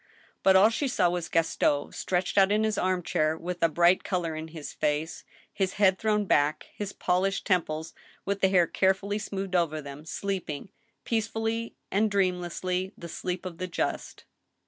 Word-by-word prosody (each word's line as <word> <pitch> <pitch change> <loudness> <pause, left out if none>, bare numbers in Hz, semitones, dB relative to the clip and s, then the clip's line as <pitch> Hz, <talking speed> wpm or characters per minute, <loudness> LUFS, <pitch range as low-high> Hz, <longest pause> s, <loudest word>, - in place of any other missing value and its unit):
Bat 190 0 +5
all 195 +3 +7
she 280 +5 -1
saw 180 -8 +2
was 175 -2 -3
Gaston 160 -3 +1
stretched 180 0 -1
out 195 0 +5
in 215 +1 +3
his 215 -1 +1
arm 185 -2 0
chair, 155 0 +1
with 180 +1 -5
a 165 - +4
bright 175 +3 +4
color 175 -4 -2
in 160 +1 -5
his 160 -2 -8
face, 155 +2 -1 0.3
his 190 -1 -1
head 190 -2 +3
thrown 210 -1 +1
back, 145 -4 +2
his 205 -1 -5
polished 185 +2 0
temples 160 -3 0 0.3
with 200 0 -2
the 190 - +4
hair 180 -2 +5
carefully 195 +3 +1
smoothed 195 -2 -4
over 165 -3 +1
them, 140 0 -9
sleeping, 190 -2 -4 0.3
peacefully 225 +1 -2 0.2
and 210 +2 +2
dreamlessly, 185 -1 -1
the 170 - -8
sleep 180 +2 -4
of 175 -2 -7
the 185 - -2
just. 175 - -3
185 Hz, 170 wpm, -28 LUFS, 165-200 Hz, 0.3 s, all